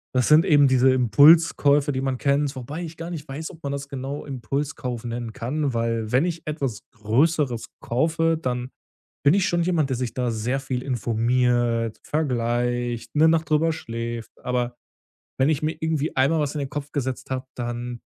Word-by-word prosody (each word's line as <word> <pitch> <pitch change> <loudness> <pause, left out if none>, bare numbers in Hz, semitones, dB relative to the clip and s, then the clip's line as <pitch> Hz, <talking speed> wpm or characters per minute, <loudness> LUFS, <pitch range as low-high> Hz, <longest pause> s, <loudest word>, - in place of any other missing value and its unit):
das 125 - +3
sind 155 +4 +6
eben 145 -5 +5
diese 130 0 +4
Impulskäufe, 145 +3 +5
die 130 -1 -2
man 135 -1 -1
kennt, 140 +1 +1
wobei 140 +7 -6
ich 160 -1 -8
gar 165 +1 -6
nicht 155 -3 -6
weiß, 150 +5 -6
ob 165 - -16
man 140 - -2
das 140 0 -4
genau 140 +1 -5
Impulskauf 135 -2 -4
nennen 120 -1 -4
kann, 140 +2 -2
weil 115 -1 -1
wenn 130 +6 +3
ich 170 -2 -3
etwas 140 -8 -2 0.2
größeres 125 +3 +1
kaufe, 165 +5 +1
dann 125 -1 -3 0.5
bin 145 +4 +5
ich 200 0 +2
schon 175 0 +1
jemand, 165 -5 +1
der 130 - 0
sich 125 -2 -3
da 125 -2 0
sehr 115 +5 -1
viel 130 -2 -3
informiert, 120 -1 +1
vergleicht, 120 -4 -1
'ne 155 +2 +6
Nacht 160 0 +2
drüber 155 +2 +3
schläft, 115 -5 -5
aber, 125 -1 -1 0.6
wenn 135 +3 +4
ich 155 -1 0
mir 155 - 0
irgendwie 160 -1 -1
einmal 140 +5 +3
was 145 -2 -1
in - - -2
den 140 -2 -3
Kopf 145 0 -5
gesetzt 130 -2 -3
habe, 130 0 -3
dann 120 0 -5
135 Hz, 180 wpm, -24 LUFS, 120-150 Hz, 0.6 s, sind